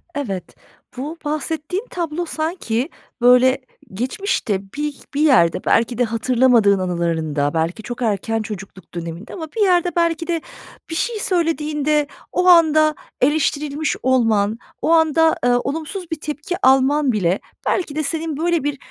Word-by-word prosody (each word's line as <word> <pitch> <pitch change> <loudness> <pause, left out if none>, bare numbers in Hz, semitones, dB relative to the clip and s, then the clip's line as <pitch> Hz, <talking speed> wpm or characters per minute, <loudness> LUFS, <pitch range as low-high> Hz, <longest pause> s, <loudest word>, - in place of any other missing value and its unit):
Evet, 200 -11 -4 0.4
bu 300 +6 -5
bahsettiğin 310 - -3
tablo 340 -1 -3
sanki, 310 -6 -2 0.3
böyle, 250 +2 +5 0.3
geçmişte 240 - -1 0.2
bir 295 -1 -3
bir 285 - 0
yerde 250 - +4
belki 235 +1 +2
de 250 - +3
hatırlamadığın 230 -3 +3
anılarında, 160 -5 -1
belki 165 +6 -1
çok 240 +2 -6
erken 225 0 0
çocukluk 195 -4 -9
döneminde 170 +4 -7
ama 320 -3 -6
bir 435 - +1
yerde 355 -2 +3
belki 335 -1 +1
de 335 -2 -1 0.5
bir 325 - -4
şey 450 +5 -1
söylediğinde 305 -5 0 0.2
o 360 0 +1
anda 310 -3 +6 0.3
eleştirilmiş 295 +1 +1
olman, 225 -5 +2 0.2
o - - +1
anda, 320 0 +4
ııı, 245 0 +4
olumsuz 325 +6 -5
bir 320 - -3
tepki 300 +4 -4
alman 270 +1 +4
bile 190 -3 +1 0.3
belki 335 -6 -1
de 310 - 0
senin 315 0 -3
böyle 340 -1 +1
bir 290 -1 -2
285 Hz, 140 wpm, -20 LUFS, 225-320 Hz, 0.5 s, anda